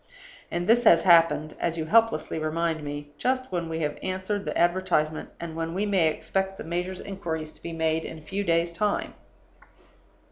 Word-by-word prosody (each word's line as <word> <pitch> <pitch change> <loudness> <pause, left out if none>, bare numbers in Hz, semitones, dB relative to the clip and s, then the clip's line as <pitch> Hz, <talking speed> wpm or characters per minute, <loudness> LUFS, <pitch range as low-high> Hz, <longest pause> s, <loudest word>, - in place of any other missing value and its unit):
And 175 +1 -2
this 235 +4 +4
has 170 -6 +7
happened 165 -3 +5
(as 170 -1 -1
you 160 - -2
helplessly 225 -5 +2
remind 160 +1 -1
me) 145 0 -6
just 255 -1 0
when 170 -2 -2
we 160 0 -3
have 150 -1 -2
answered 190 +2 -2
the 150 - -2
advertisement, 170 -3 +1
and 165 -1 -6
when 165 +1 -3
we 200 +2 0
may 190 -5 +3
expect 190 +5 -2
the - - -6
major's 180 +3 -3
inquiries 160 -5 -4
to - - -17
be 170 - -6
made 160 0 0
in 160 - -7
a - - -12
few 195 +6 -3
days' 170 -1 +1
time. 205 +4 -1
170 Hz, 185 wpm, -26 LUFS, 160-190 Hz, -, has